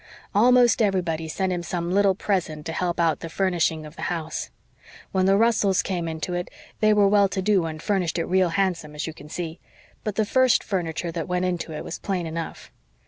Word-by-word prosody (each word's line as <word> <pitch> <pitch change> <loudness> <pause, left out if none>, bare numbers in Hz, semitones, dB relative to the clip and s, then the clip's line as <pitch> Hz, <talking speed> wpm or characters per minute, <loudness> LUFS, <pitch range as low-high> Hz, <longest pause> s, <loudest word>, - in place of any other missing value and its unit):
"Almost 245 +3 +5
everybody 175 -6 0
sent 185 +4 -1
him 175 - -2
some 175 0 -3
little 200 0 +3
present 170 -7 -2
to - - -3
help 175 -1 -1
out 165 -2 +2
the 165 - -6
furnishing 165 -3 0
of 150 - -11
the - - -9
house. 165 -2 -3 0.6
When 190 -1 +2
the 195 0 +5
Russells 215 -4 +3
came 175 -3 -2
into 160 +2 -4
it 175 0 -3 0.3
they 215 0 +4
were 205 -1 +5
well 200 0 +5
to 190 - -3
do 190 -3 +2
and 155 -1 -6
furnished 180 -2 0
it 165 - 0
real 185 -1 +2
handsome, 165 -4 -1
as 150 - -3
you 160 - -5
can 150 -1 -13
see; 170 0 -5 0.4
but 210 -2 -3
the 215 - +2
first 260 +3 +3
furniture 175 -3 -2
that 165 -1 -4
went 180 0 0
into 175 -2 -2
it 155 - -5
was - - -6
plain 185 -4 -2
enough. 165 0 -6
180 Hz, 210 wpm, -24 LUFS, 165-195 Hz, 0.6 s, Almost